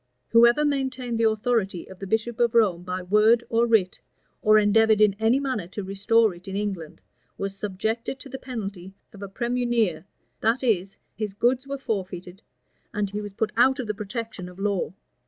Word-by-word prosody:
Whoever 235 +5 +5
maintained 260 -4 -1
the 225 -1 +4
authority 215 -4 -1
of 190 -1 -12
the 195 - -6
bishop 220 +3 -1
of 235 -1 +2
Rome 200 -7 +3
by 180 +1 -4
word 215 +5 +4
or 230 +1 +2
writ, 210 -6 +2 0.4
or 215 0 +5
endeavored 215 +1 +4
in 210 -2 +4
any 225 +4 +3
manner 255 -10 -2
to 200 +2 -6
restore 205 +3 +2
it 175 +3 -15
in 195 - -5
England, 195 -6 -4 0.4
was 195 0 -4
subjected 220 +6 -3
to - - -9
the 265 0 -7
penalty 195 -7 -7 0.2
of 205 - -12
a 200 - -6
premunire 235 -6 0 0.3
that 230 +4 +1
is, 195 -6 0 0.2
his 210 -2 -4
goods 250 +5 +1
were 280 0 -3
forfeited, 190 -6 -5 0.5
and 205 -1 -2
he 210 +1 -3
was 205 -1 -7
put 215 +2 -1
out 260 +3 +4
of 255 - -3
the 210 - -2
protection 210 -2 -6
of 180 - -14
law. 195 -4 -1
215 Hz, 185 wpm, -25 LUFS, 195-235 Hz, 0.5 s, Whoever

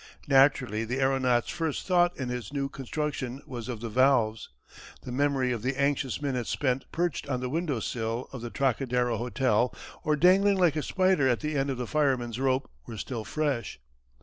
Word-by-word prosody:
Naturally 135 -5 +4
the 125 +4 -2
aeronaut's 130 -3 +2
first 160 -4 -2
thought 175 -1 +3
in 130 -2 -3
his 125 -4 -4
new 140 -1 -2
construction 135 -1 -4
was 125 -2 -7
of 115 -3 -5
the 115 - -4
valves. 120 -2 +2 0.5
The 125 - -7
memory 135 -1 +1
of 120 -3 -2
the 130 +4 -2
anxious 140 -2 0
minutes 125 -5 -2
spent 130 -2 -1
perched 175 -3 -2
on 130 -2 0
the 125 0 -3
window 155 -5 -1
sill 115 +2 -3
of 130 - -6
the 120 - -5
Trocadero 125 -2 0
Hotel 125 0 +1 0.3
or 150 - +2
dangling 190 +5 +5
like 175 -5 +3
a 155 - 0
spider 185 -5 +2
at 120 - +1
the 155 0 -2
end 140 0 0
of 135 - -2
the 125 - -3
firemen's 130 -5 0
rope 130 0 +1 0.2
were 115 - -7
still 115 0 -4
fresh. 130 - -2
130 Hz, 185 wpm, -28 LUFS, 120-145 Hz, 0.5 s, dangling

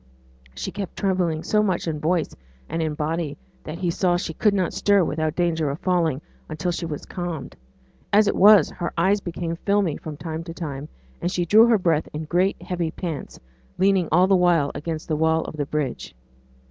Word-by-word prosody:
She 65 - -4
kept 195 -3 -6
trembling 180 -5 0
so 210 - +2
much 190 -5 -1
in 155 -2 -2
voice 165 +1 0 0.3
and 165 - -2
in 155 -2 -1
body, 155 -1 -2 0.3
that 155 +2 -6
he 175 -1 -1
saw 175 0 +1
she 165 - -4
could 205 +4 +2
not 185 -3 0
stir 200 -2 +3
without 155 0 -1
danger 165 -4 0
of 140 - -3
falling 165 -6 +1 0.3
until 160 +3 -2
she 170 0 -3
was 150 -2 -6
calmed; 170 -7 -5 0.6
as 210 +1 +5
it - - +1
was, 200 -4 +7
her 175 - -4
eyes 195 +4 +2
became 170 -1 -4
filmy 200 -4 +1
from 155 -2 -8
time 160 +1 -5
to 165 -1 -8
time, 150 -4 -6 0.3
and 175 - -1
she 175 -1 -1
drew 220 +7 +6
her 230 -2 +5
breath 165 -5 0
in 150 +1 -4
great 180 +5 +1
heavy 175 -3 -2
pants, 165 -3 -6 0.4
leaning 190 -2 +2
all 180 +4 +5
the 195 0 +4
while 175 -5 +3
against 155 0 -5
the 155 - 0
wall 160 +1 +2
of - - -7
the 145 -2 -3
bridge. 140 - -3
170 Hz, 200 wpm, -23 LUFS, 155-185 Hz, 0.6 s, was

